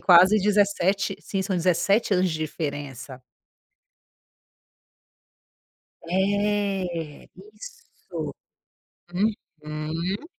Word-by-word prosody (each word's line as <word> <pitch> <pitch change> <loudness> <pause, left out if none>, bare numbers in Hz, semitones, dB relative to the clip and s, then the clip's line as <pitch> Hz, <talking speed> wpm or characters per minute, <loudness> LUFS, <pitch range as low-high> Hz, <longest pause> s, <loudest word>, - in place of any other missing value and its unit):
quase 185 +4 +7
17 200 -1 +2
sim, 195 -1 -2
são 190 -1 -1
17 190 +5 +2
anos 185 0 +2
de 160 - -3
diferença. 145 -4 -5 2.9
É, 195 -4 0
isso. 465 +2 -9 0.8
Uhum. 165 - -3
185 Hz, 65 wpm, -25 LUFS, 160-205 Hz, 2.9 s, quase